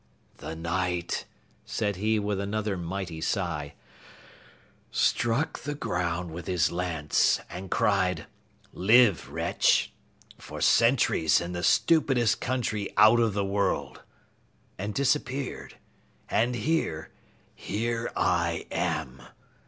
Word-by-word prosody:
"The 80 - -7
Knight," 90 +1 -2 0.4
said 105 -4 -2
he 110 +3 +1
with 105 -1 -1
another 100 0 -2
mighty 85 -1 -5
sigh, 80 -6 -2 1.1
"struck 120 +7 0
the 145 +1 -5
ground 90 - -2
with 85 +1 -8
his 90 -2 +1
lance 85 -4 +1
and 90 +2 -7
cried, 95 -3 +1 0.5
'Live 105 - +4
Wretch, - - +1 0.5
for - - -9
centuries 115 - +3
in 85 +1 -5
the 90 0 -4
stupidest 135 - +3
country 115 -5 -2
out 110 +3 +7
of 115 -3 +2
the 100 -1 0
world,' 100 +1 -1 0.8
and 100 +3 -3
disappeared. 135 -1 -1 0.5
And 120 +2 +2
here 110 - -1 0.4
here 115 +2 -3
I 85 -2 0
am!" 80 -7 -2
100 Hz, 105 wpm, -27 LUFS, 85-115 Hz, 1.1 s, out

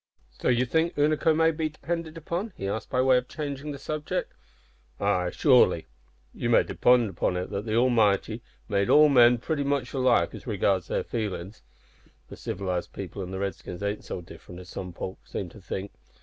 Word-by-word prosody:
"So 60 - -5
you 125 0 +3
think 160 +6 +1
Unaco 155 +2 +3
may 160 +1 +4
be 155 0 -2
depended 165 +1 -5
on?" 190 +5 -2
he 100 - -4
asked, 110 +2 -3
by 125 - +2
way 130 -1 +5
of 125 0 -2
changing 145 -1 -5
the 140 - -6
subject. 150 +2 -3 0.7
"Ay, 90 -3 +1
surely. 120 - +4 0.5
You - - -2
may - - +5
depend 120 -5 +3
on 90 - +1
it 90 - -4
that 100 +3 -4
the 110 - 0
Almighty 115 -2 +2 0.3
made 100 -2 +1
all 150 0 +7
men 120 -3 +6
pretty 145 +4 -2
much 140 -3 -1
alike 130 -2 +2
as - - -10
regards 95 -4 +1
their - - -1
feelin's. 105 - -4 0.7
The - - -8
civilised 90 -2 -4
people 100 +1 -6
an' 90 - -5
the 95 - -5
Redskins 95 -1 -5
ain't 100 +1 -2
so - - -5
different 90 +1 -12
as 90 - -13
some 90 -2 -6
folk 95 +2 -6
seem 95 - -4
to 105 - -14
think. 95 +2 -5
120 Hz, 190 wpm, -27 LUFS, 95-145 Hz, 0.7 s, all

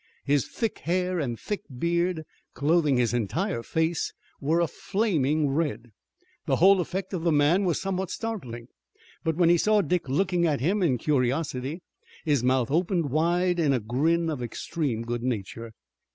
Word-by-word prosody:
His 140 -2 +2
thick 225 -3 -3
hair 180 +1 0
and 125 -6 -2
a - - -18
thick 205 -1 -4 0.2
beard 170 +2 0 0.3
clothing 145 0 +2
his 120 -1 +1
entire 120 - -1
face 160 +5 -1 0.3
were 155 +4 +1
a 170 - +3
flaming 155 - 0
red. 140 -5 -2 0.6
The - - +3
whole 190 +1 +5
effect 190 +2 -4
of 175 -3 -2
the 170 - +2
man 155 +6 +3
was 175 -3 +1
somewhat 190 -1 -2
startling, 130 - -5 0.6
but 160 -1 0
when 170 0 +4
he 175 0 +5
saw 215 +2 +3
Dick 175 -4 -1
looking 175 +3 +1
at 150 -3 0
him 190 - +1
in 145 -9 +2
curiosity 135 +3 -1 0.4
his 145 -6 +2
mouth 130 0 +2
opened 170 -2 +1
wide 175 +4 +1
in 150 -4 +3
a 130 - +1
grin 155 +10 +1
of 145 -5 -4
extreme 120 0 -3
good 120 0 -3
nature. 115 -1 -4
160 Hz, 165 wpm, -26 LUFS, 130-180 Hz, 0.6 s, whole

